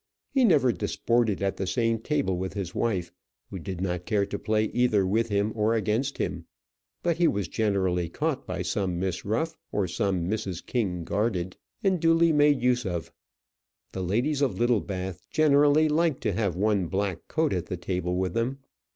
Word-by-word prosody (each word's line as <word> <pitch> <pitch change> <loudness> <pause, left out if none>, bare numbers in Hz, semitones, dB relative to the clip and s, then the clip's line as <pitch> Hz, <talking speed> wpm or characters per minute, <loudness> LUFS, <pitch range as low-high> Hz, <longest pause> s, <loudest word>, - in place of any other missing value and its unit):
He 265 - +3
never 145 - +5
disported 110 -1 0
at 95 - 0
the 95 - -2
same 115 +4 +1
table 140 -6 0
with 95 +1 -3
his 95 -3 -4
wife, 95 -7 -1 0.4
who 95 - -5
did 95 +1 -6
not 90 -2 -2
care 105 -3 +2
to 100 0 -5
play 110 0 +1
either 110 -4 +2
with 110 +5 +1
him 100 +1 +1
or 110 +1 +2
against 115 +5 0
him; - - -3 0.6
but 170 -2 +1
he 175 -1 +4
was 100 - 0
generally 95 -5 0
caught 145 - -2
by - - -3
some 95 -5 -1
Miss 90 -1 -2
Ruff, 160 +11 -1 0.2
or 100 -2 0
some 90 -1 -1
Mrs. 95 -4 -3
King 95 -8 -1
Garded, 95 -2 -1 0.3
and 190 -3 +2
duly 165 +1 +4
made 145 -3 +4
use 125 -1 +2
of. 85 -5 -4 0.8
The 95 - -4
ladies 120 - 0
of 140 -4 +1
Littlebath 95 -6 -1
generally 150 0 +4
liked 155 -1 +1
to - - 0
have 100 -3 0
one 100 -1 +1
black 95 -1 -2
coat 160 -1 +1
at 90 -2 -2
the 90 - -4
table 90 0 -2
with 95 -1 -1
them. 120 +4 -1
105 Hz, 180 wpm, -27 LUFS, 95-130 Hz, 0.8 s, never